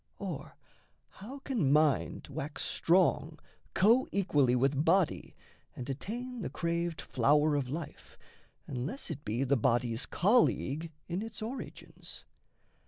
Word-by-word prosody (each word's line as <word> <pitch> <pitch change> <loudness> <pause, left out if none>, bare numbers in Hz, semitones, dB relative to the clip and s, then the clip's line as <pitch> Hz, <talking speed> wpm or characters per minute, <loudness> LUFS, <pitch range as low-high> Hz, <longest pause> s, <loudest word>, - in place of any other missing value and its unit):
Or - - -6 0.5
how 235 +9 -10
can 215 - +1
mind 150 -1 +2
wax 145 +2 -4
strong 165 -3 +2 0.4
Coequally 195 - +3
with 135 +3 +2
body 175 +1 +1 0.4
and 125 - -6
attain 240 - -5
The - - -3
craved 170 -1 -2
flower 150 +4 +2
of 135 -3 -1
life, 155 +2 -7 0.5
unless 140 - -4
it 145 -2 -6
be 115 +4 -1
The 135 +1 +2
body's 120 0 +1
colleague 170 - +2 0.2
in 175 +3 -2
its 225 0 -6
origins? 250 +5 -8
155 Hz, 115 wpm, -31 LUFS, 135-195 Hz, 0.5 s, Coequally